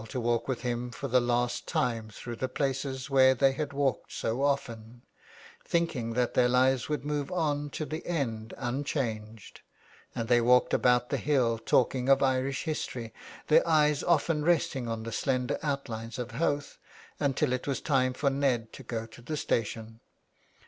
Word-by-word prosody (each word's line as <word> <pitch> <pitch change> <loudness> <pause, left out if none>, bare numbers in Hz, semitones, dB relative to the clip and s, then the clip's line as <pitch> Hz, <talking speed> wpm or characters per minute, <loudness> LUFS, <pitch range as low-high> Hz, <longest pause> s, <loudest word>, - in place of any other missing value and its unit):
to 125 - -3
walk 115 -1 0
with 130 -3 -2
him 120 0 -2
for 130 +4 -5
the 125 0 +3
last 120 0 0
time 115 -3 -1
through 120 +3 -7
the 130 +3 -3
places 135 -1 -2
where 130 -1 +5
they 135 +1 +4
had 145 +2 -3
walked 140 -2 -1
so 115 +4 -2
often, 120 -4 -2 0.6
thinking 145 -9 -1
that 125 0 0
their 125 -1 +4
lives 130 0 +2
would 145 -3 -2
move 145 +2 -2
on 150 -4 -1
to 155 - -4
the 155 +2 -5
end 115 -10 -2
unchanged; 120 -5 -4 0.5
and 115 - -2
they 120 0 +4
walked 125 +2 +4
about 125 -1 +3
the - - +1
hill 125 -6 +1
talking 130 +2 +1
of 135 0 +5
Irish 130 0 0
history, 125 -7 -4 0.3
their 155 - +4
eyes 150 -2 +3
often 165 -2 +2
resting 150 -6 +1
on 115 -1 -3
the 115 - -5
slender 130 +2 -1
outlines 125 -6 -4
of 125 -1 -5
Howth, 145 +2 -2 0.4
until 135 -3 +1
it 125 - -3
was 140 - -1
time 130 -3 +1
for 140 +2 0
Ned 130 -5 0
to - - -9
go 115 -3 -4
to 115 +1 -14
the 150 +6 -4
station. 115 -3 -2
130 Hz, 170 wpm, -29 LUFS, 120-140 Hz, 0.6 s, where